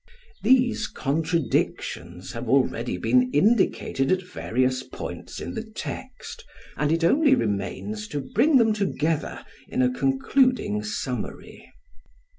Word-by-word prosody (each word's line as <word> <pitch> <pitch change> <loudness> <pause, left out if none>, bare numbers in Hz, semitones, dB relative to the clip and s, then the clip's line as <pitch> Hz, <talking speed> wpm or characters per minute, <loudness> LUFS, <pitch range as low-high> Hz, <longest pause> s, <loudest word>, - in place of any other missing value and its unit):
These 245 -2 +3
contradictions 135 - -2
have 115 0 -6
already 125 -5 +1
been 125 +6 +3
indicated 170 - +2
at 185 0 +2
various 130 -7 -1
points - - -7
in - - -5
the - - -3
text, - - -8 0.3
and 150 0 0
it 165 +1 +1
only 275 - +5
remains 105 - -3
to 145 - -3
bring 240 - +2
them 225 -3 +4
together 165 -6 -1 0.2
in 130 - 0
a 125 0 +2
concluding 135 - +1
summary. 125 +4 -5
135 Hz, 115 wpm, -25 LUFS, 120-205 Hz, 0.3 s, only